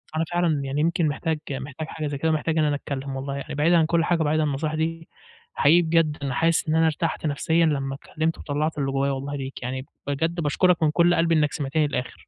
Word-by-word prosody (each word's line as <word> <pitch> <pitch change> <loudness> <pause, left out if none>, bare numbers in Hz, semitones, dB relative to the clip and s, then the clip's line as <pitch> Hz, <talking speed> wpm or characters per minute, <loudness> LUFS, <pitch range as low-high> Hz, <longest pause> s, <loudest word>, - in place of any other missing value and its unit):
أنا 160 - +1
فعلًا 170 -4 +2
يعني 140 +2 -1
يمكن 170 0 +1
محتاج 155 +1 -2
محتاج 140 +3 -5
حاجة 155 -2 -4
زي 145 -1 -3
كده، 160 +3 +1
محتاج 155 +1 0
إن 155 - +3
أنا 145 -1 +1
أتكلم 135 -1 -5
والله، 135 +1 -4
يعني 140 0 -6
بعيدًا 165 +4 +4
عن 160 - +4
كُلّ 165 +1 +2
حاجة 170 -2 +1
وبعيدًا 155 +1 +2
عن - - +1
النصيحة 155 +3 -2
دي 165 +1 -2 0.5
حقيقي 165 +4 +5
بجد 160 -2 +2
أنا 135 -2 -2
حاسس 165 +5 +2
إن 155 - +2
أنا 160 0 +4
ارتحت 160 +1 -1
نَفسيًا 160 +3 +2
لمّا 135 -3 -1
اتكلمت 155 +3 -3
وطَلّعت 150 +2 -2
اللي 135 -1 -1
جوايا 135 +1 0
والله 140 +1 -4
ليك، 135 -2 -6
يعني 130 +2 -4 0.2
بجد 160 +4 -1
باشكرك 170 +3 +2
من 155 - +3
كُلّ 175 +2 +4
قلبي 165 0 +2
إنك 150 -2 +2
سمعتني 150 +1 0
للآخر. 125 -2 -4
155 Hz, 230 wpm, -24 LUFS, 140-165 Hz, 0.5 s, حقيقي